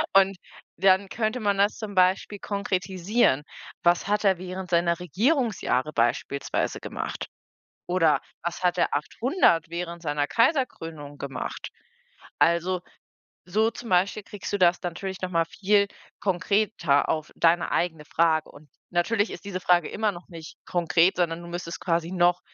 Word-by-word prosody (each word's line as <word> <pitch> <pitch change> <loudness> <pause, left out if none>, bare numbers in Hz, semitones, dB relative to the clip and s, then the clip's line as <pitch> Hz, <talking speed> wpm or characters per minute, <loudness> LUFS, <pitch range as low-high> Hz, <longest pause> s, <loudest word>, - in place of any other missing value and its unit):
Und, 195 -1 +5 0.4
dann 190 +1 +4
könnte 220 +2 -1
man 200 -2 +1
das 205 +1 +2
zum 210 -2 -6
Beispiel 190 +2 +2
konkretisieren: 190 - 0 0.4
„Was 175 +2 +3
hat 210 +1 +1
er 190 -3 +3
während 185 -1 -6
seiner 170 0 +2
Regierungsjahre 190 - 0
beispielsweise 120 +4 -1
gemacht? - - -5 0.6
Oder, 165 -4 +3 0.2
was 175 +2 -4
hat 180 -1 +2
er - - +2
800, 165 - +2
während 170 0 -5
seiner 145 -2 0
Kaiserkrönung 165 - 0
gemacht?“ 135 -2 -5 0.7
Also, 170 +2 +2 0.7
so 220 +5 +2
zum 235 -1 -9
Beispiel 190 +4 +2
kriegst 205 0 -8
du - - +1
das 175 -1 +4
natürlich 185 +2 -5
noch 185 - -3
mal 165 -2 +2
viel 200 +4 +2 0.3
konkreter 185 -5 +1
auf 155 -1 -2
deine 170 +1 +3
eigene 160 -4 -1
Frage. 160 -1 +1
Und 145 -1 -17 0.2
natürlich 205 +5 +1
ist - - -9
diese 185 -2 -4
Frage 175 -2 +3
immer 215 -1 0
noch 175 0 -12
nicht 165 -3 -10
konkret, 175 +1 +2
sondern 170 -1 0
du 170 - -9
müsstest 170 -1 -5
quasi 170 -1 0
noch 175 -1 +3
180 Hz, 145 wpm, -26 LUFS, 165-200 Hz, 0.7 s, Und